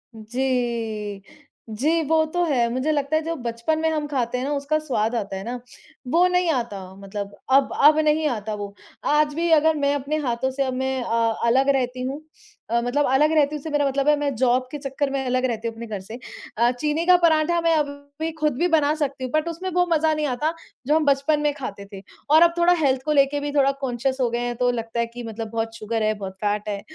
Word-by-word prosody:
जी। 225 -3 -2 0.5
जी, 305 +10 +1
वो 315 +2 +3
तो 350 0 +1
है। 250 -6 +2
मुझे 265 +5 0
लगता 290 +1 0
है 315 - +2
जो 330 +1 -3
बचपन 240 +5 -2
में 320 0 +1
हम 305 -2 -2
खाते 250 -3 -1
हैं 255 - -2
ना, 290 - -2
उसका 285 +2 0
स्वाद 245 -6 -1
आता 200 -3 -3
है 190 - -6
ना, 245 +2 -5 0.5
वो 340 +7 +4
नहीं 360 -1 +1
आता 235 -7 -2 0.2
मतलब 200 +1 -7
अब 270 +1 +4
अब 300 +2 +7
नहीं 305 0 +2
आता 215 -3 -3
वो। 200 -1 -6 0.3
आज 300 0 +2
भी 335 +2 -1
अगर 315 0 +5
मैं 285 -1 +1
अपने 285 +2 -2
हाथों 240 +3 -1
से 275 +1 -1
अब 260 -1 -2
मैं 265 0 -1
अ, 230 -1 +1
अलग 265 +4 +3
रहती 250 -1 -2
हूँ 270 +4 -4 0.5
अ, 235 +1 +2
मतलब 265 +5 +1
अलग 300 +4 +4
रहती 300 0 +3
हूँ, - - -4
इससे 315 - -7
मेरा 290 -1 +1
मतलब 275 +1 -1
है 300 - +5
मैं 285 -2 -1
जॉब 255 +1 +2
के 295 - -4
चक्कर 275 0 -2
में 270 -1 -2
अलग 255 +1 +1
रहती 230 -2 -2
हूँ 225 - -4
अपने 230 0 -7
घर 210 -3 -4
से 225 +6 -9 0.4
अ, 240 +2 +4
चीनी 300 +6 -1
का 365 0 +7
पराँठा 335 0 +3
मैं 330 -1 +3
अभी 290 -1 0 0.3
भी 325 - -2
ख़ुद 300 -2 +1
भी 350 - +2
बना 305 -3 +3
सकती 280 -3 -3
हूँ, 255 - -4
बट 310 +2 +1
उसमें 365 +3 -4
वो 355 0 +2
मज़ा 315 0 +2
नहीं 305 -1 -1
आता, 295 +6 -1 0.3
जो 300 - +3
हम 315 -2 +2
बचपन 280 +2 +2
में 295 -1 +1
खाते 205 -8 -7
थे 195 - -8 0.3
और 315 +2 +6
अब 340 0 +6
थोड़ा 345 +1 +5
हेल्थ 265 -3 +2
को 305 - 0
लेके 280 0 +3
भी 290 0 -3
थोड़ा 275 -1 +4
कॉन्शियस 260 +1 -1
हो 240 - +2
गए 235 +1 -2
हैं, 240 0 -2
तो 245 +1 +1
लगता 230 0 -4
है 235 - +2
कि 240 +1 -9
मतलब 225 0 -6
बहुत 225 0 -3
शुगर 220 0 -2
है, 215 0 +2
बहुत 195 -2 -7
फैट 210 0 -1
है। 200 -1 -3
270 Hz, 245 wpm, -23 LUFS, 235-305 Hz, 0.5 s, अब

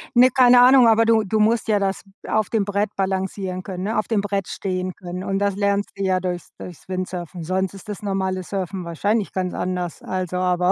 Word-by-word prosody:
Ne, 250 +2 +7
keine 250 -1 +6
Ahnung, 255 -1 +7
aber 225 0 +5
du 225 -1 +4
du 215 +2 -1
musst 225 +2 +2
ja 210 -2 +3
das 195 -1 -2 0.2
auf 215 -1 0
dem 220 -3 +1
Brett 205 +1 -1
balancieren 190 -1 -2
können, 185 -1 -5
ne, 220 +2 -1
auf 215 - 0
dem 220 -3 +1
Brett 200 -2 -2
stehen 185 -1 -3
können. 180 +1 -7
Und 195 0 -1
das 200 -1 0
lernst 200 0 0
du 195 - -2
ja 185 -1 +2
durchs 180 -1 -4
durchs 180 -1 -10
Windsurfen. 180 -2 -5
Sonst 190 +3 -1
ist 195 +2 -12
das 210 0 -6
normale 190 -2 -1
Surfen 190 -1 -4
wahrscheinlich 205 +6 -1
ganz 185 -1 -2
anders, 180 -2 -3
also 185 -1 -3
aber 180 0 +2
195 Hz, 215 wpm, -22 LUFS, 185-210 Hz, 0.2 s, Ne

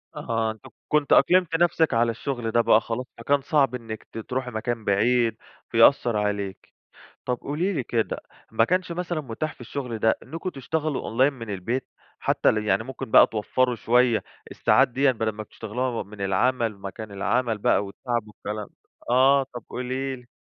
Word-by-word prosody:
أها، 115 -1 -1
أنتِ 110 - -13 0.3
كنتِ 150 -2 +1
أقلمتِ 180 -3 +4
نفسِك 165 -2 +2
على 115 0 +3
الشغل 115 0 -3
ده 120 - +4
بقى 110 -1 +5
خلاص، 120 +3 -4
فكان 140 0 +1
صعب 135 -3 +2
إنِّك 115 -3 -7
ت - - -9
تروحي 125 +2 -3
مكان 115 0 -3
بعيد، 115 +3 +2 0.3
فيأثّر 115 -1 +4
عليكِ. 100 -2 -3 0.5
طَب 125 - 0
قولي 170 +8 -1
لي 145 - -1
كده، 115 -2 -1 0.3
ما 115 0 +3
كانش 185 +3 0
مثلًا 175 -2 -2
متاح 145 +3 -4
في - - -30
الشغل 120 -1 -5
ده 110 +1 +2
إنّكم 165 +3 -6
تشتغلوا 150 +1 -2
Online 130 +6 +2
من 115 -5 -8
البيت، 110 +7 -3 0.3
حتى - - +1
ال 110 -1 +2
يعني 100 +2 +2
ممكن 130 -3 -7
بقى - - +8
توفروا 125 +3 0
شوية 120 +1 +3 0.3
الساعات - - +3
ديًا 135 +2 +2
بدل 110 -2 -1
ما 110 +1 -7
بتشتغلوها 115 +4 -4
و 120 - -3
من 105 0 -13
العمل، 115 +2 +1
مكان 100 +2 -8
العمل 115 +3 0
بقى 105 - +2
والتعب 120 +4 -3
والكلام 105 -1 -6
ده، - - -28 0.4
آه، 135 +3 +5
طَب 120 -2 -7
قولي 130 +2 -3
لي. 125 - -16
120 Hz, 175 wpm, -25 LUFS, 110-135 Hz, 0.5 s, بقى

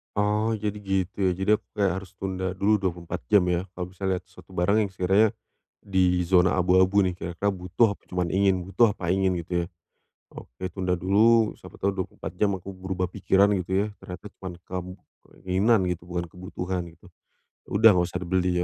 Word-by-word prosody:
Oh, 105 +2 +1
jadi 105 -1 -3
gitu, 95 -2 -2
ya. 95 - +3
Jadi 95 +3 -3
aku 105 - -31
kayak 100 -2 +1
harus 95 0 -9
tunda 95 -1 -3
dulu 100 +3 +2
24 90 -3 -4
jam, 100 - +8
ya. 90 +1 0
Kalau 90 -1 -4
bisa 95 +1 -7
lihat 95 -1 0
suatu 95 0 -16
barang 90 +4 +2
yang - - -6
sekiranya 95 +4 +3 0.5
di 90 -2 +2
zona 90 +1 +4
abu-abu 95 +2 +4
nih, 90 - 0
kira-kira 90 +3 -2
butuh 95 +4 +1
apa - - -15
cuma 90 -1 -1
ingin, 95 -2 +2
butuh 100 +3 +2
apa 90 0 -1
ingin, 95 -1 +1
gitu 90 - -12
ya. - - -9 0.7
Oke, 90 +9 -8
tunda 90 -1 -1
dulu, 110 +5 +4
siapa - - -12
tahu 100 - 0
24 95 -3 -5
jam 105 - +4
aku 95 +2 -9
berubah 95 -1 -4
pikiran, 100 +1 +3
gitu 90 +1 -6
ya, 100 +2 +2
ternyata 90 +3 -9 0.2
cuma 95 - -5 0.2
kam 90 -1 -5 0.6
keinginan 95 +3 +3
gitu, 90 -1 -3
bukan 85 -1 -2
kebutuhan, 90 +1 -5
gitu. 90 +1 -19 0.6
Udah, 110 +2 +6
nggak 90 -2 +2
usah 90 - -4
dibeli, 90 0 +1
95 Hz, 185 wpm, -26 LUFS, 90-100 Hz, 0.7 s, jam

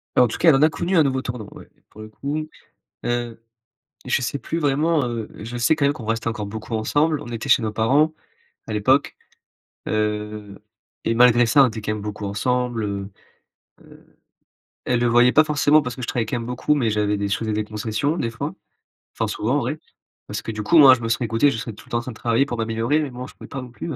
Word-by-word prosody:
Bah, - - +6
en - - +3
tout - - -4
cas, - - +1
elle 160 - +8
en 135 - +2
a 155 - +6
connu, 175 +4 -2
un 160 - +6
nouveau 130 -2 0
tournant, 120 -5 -6
ouais, - - -13 0.2
pour 110 - -13
le 110 - -8
coup. 145 +7 -4 0.6
Heu, 120 -1 -3 0.6
je - - +1
sais 130 +3 -2
plus 165 - -4
vraiment, 150 +1 +1
heu, 115 -3 -4 0.2
je 120 +2 -6
sais 120 +7 +3
quand 150 - -2
même 140 - +4
qu'on 125 -7 -9
reste 115 +1 -2
encore 110 -2 -3
beaucoup 110 +2 -5
ensemble, 145 +8 +1
on - - -9
était 120 +3 -5
chez 120 - +5
nos 110 -1 -3
parents 145 +8 +2 0.5
à - - -5
l'époque, 130 +7 +2 0.7
heu, 105 -1 -3 0.5
et 115 - +2
malgré 120 0 +6
ça, 140 +4 +5
on - - +5
était 110 0 -6
quand 105 - -2
même 105 - -5
beaucoup 105 0 -5
ensemble, 120 +3 -1
heu, 100 -1 -4 0.7
heu, - - -20 0.7
elle 125 -1 +1
le - - +2
voyait 120 +1 +5
pas 155 - +6
forcément 150 0 +3
parce 125 -2 -5
que 130 - -8
je 120 - -4
travaille 120 -2 -1
quand 110 - -3
même 115 - -6
beaucoup, 125 +4 0
mais 125 -6 +1
j'avais 105 -1 0
je 100 - 0
faisais 110 -1 -3
des 105 0 -1
concessions, 110 +8 -2
des 115 - -2
fois, 115 - -5 0.6
enfin - - -1
souvent, - - -1
en - - +3
vrai. - - -3 0.5
Parce - - -5
que, - - -5
du 110 -1 -4
coup, 165 +10 +5
moi, 135 -3 +9
je 130 - -7
me 115 - -3
serais 120 +1 0
écouté, 115 +6 +2
je 115 - -4
serais 110 0 -6
tout 110 - -15
le - - -21
temps 120 - +2
en - - -2
train 120 - -7
de 115 - -11
travailler 115 +3 +1
pour 120 -4 -5
m'améliorer 115 +6 0
mais 145 - -4
bon, 125 +1 -7
je - - -15
pouvais - - -11
pas 135 -2 -6
non 125 - -10
plus 120 - -7
120 Hz, 250 wpm, -22 LUFS, 110-135 Hz, 0.7 s, moi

